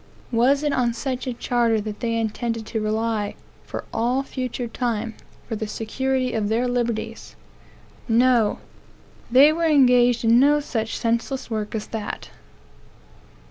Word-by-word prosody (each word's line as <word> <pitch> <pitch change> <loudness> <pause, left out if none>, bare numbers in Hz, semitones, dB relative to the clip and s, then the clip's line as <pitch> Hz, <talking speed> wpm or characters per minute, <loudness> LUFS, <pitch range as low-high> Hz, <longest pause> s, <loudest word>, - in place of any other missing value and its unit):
Was 260 +5 +3
it 295 -1 +1
on 240 -2 +1
such 260 +1 -3
a 255 - -1
charter 235 -2 +1
that 210 0 -5
they 230 -1 -1
intended 230 0 -2
to 220 0 -3
rely, 215 -1 -1 0.3
for - - -5
all 250 +4 +1
future 255 -2 -4
time, 230 -2 -2 0.3
for 225 - -3
the 220 0 -4
security 255 +4 -1
of 215 -2 -1
their 235 +3 +1
liberties? 240 -2 -3 0.7
No. 235 -2 +3 0.7
They 275 +5 +7
were 335 +1 0
engaged 250 -5 +4
in 230 +1 +6
no 290 +3 +5
such 225 -6 -3
senseless 235 +2 -2
work 215 0 -3
as 215 -1 -3
that. 220 -2 -5
235 Hz, 140 wpm, -23 LUFS, 225-255 Hz, 0.7 s, They